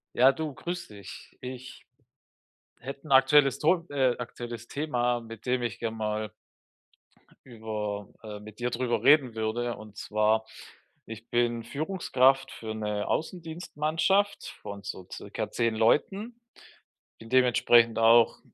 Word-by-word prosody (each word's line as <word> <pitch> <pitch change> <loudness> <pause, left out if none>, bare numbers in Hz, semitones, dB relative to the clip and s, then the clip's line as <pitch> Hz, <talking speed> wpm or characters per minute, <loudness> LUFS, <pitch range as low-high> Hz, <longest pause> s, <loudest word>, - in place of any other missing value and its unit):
Ja, 130 +2 +6
du, 150 0 -5
grüße 175 -10 -6
dich. 100 -2 -12
Ich 130 0 -9 0.9
hätte 140 +4 -8
'n - - -3
aktuelles 135 +1 +5
Ton 170 +2 +2
äh, 130 -3 +2
aktuelles 120 -1 -7
Thema, 125 -5 -1
mit 115 -2 -11
dem 125 0 +1
ich 120 -4 -3
gerne 115 -1 -3
mal 110 0 -3 1.1
über, 105 -4 -5
äh 105 -2 -8
mit 105 0 -13
dir 120 0 -1
darüber 120 0 -1
reden 140 -5 +5
würde. 115 +2 -2
Und 110 -1 -13
zwar: 110 +1 +1 0.6
Ich 115 +1 -10
bin 120 -1 +1
Führungskraft 135 -3 +1
für 110 -1 -6
'ne 105 -1 -2
Außendienstmannschaft 165 +3 -1
von 100 0 -7
so 95 -2 -7
circa - - -5
10 115 -1 0
Leuten. 195 - +1 0.8
Bin 115 - -12
dementsprechend 120 -2 +4
auch, 115 0 +5
120 Hz, 130 wpm, -28 LUFS, 110-140 Hz, 1.1 s, Ja